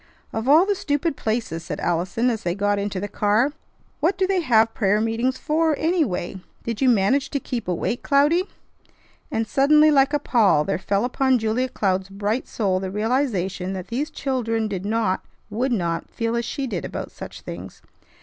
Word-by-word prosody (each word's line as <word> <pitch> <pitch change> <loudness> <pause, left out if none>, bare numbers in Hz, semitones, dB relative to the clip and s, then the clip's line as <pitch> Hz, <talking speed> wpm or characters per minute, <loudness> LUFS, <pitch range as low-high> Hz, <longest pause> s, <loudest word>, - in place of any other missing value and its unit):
"Of 225 +2 -3
all 320 +6 +7
the 410 - +2
stupid 290 -4 -1
places!" 220 -9 -2
said - - -5
Allison 180 +8 0
as 225 - -3
they 175 0 -1
got 205 0 +1
into 200 -1 -2
the 205 - -3
car. 215 +7 +2 0.5
"What 335 +6 +1
do 375 - +2
they 375 -1 +1
have 225 -6 +3
prayer 205 -1 +2
meetings 230 +4 0
for, 315 +1 +1
anyway? 265 - -1 0.2
Did 230 0 -4
you 265 - +5
manage 245 +5 +2
to 280 - -1
keep 245 -5 -5
awake, 185 +6 -1
Cloudy?" 295 +6 +3 0.8
And 225 0 -1
suddenly 300 +2 +5
like 275 -1 +4
a 295 - +2
pall 210 - +3
there 150 - -1
fell 200 +3 0
upon 260 +1 +2
Julia 230 +3 0
Cloud's 190 -4 -1
bright 205 +5 -2
soul 190 -4 0
the 190 0 -4
realization 200 -4 -1
that 185 -2 -6
these 275 +7 -2
children 230 -7 -1
did 200 -1 -4
not, 215 -4 0 0.3
would 250 +5 -1
not, 170 -7 -1
feel 230 0 -2
as 235 0 -1
she 275 +4 -3
did 200 -9 -3
about - - -5
such - - -9
things. 90 +2 -9
225 Hz, 185 wpm, -23 LUFS, 195-270 Hz, 0.8 s, all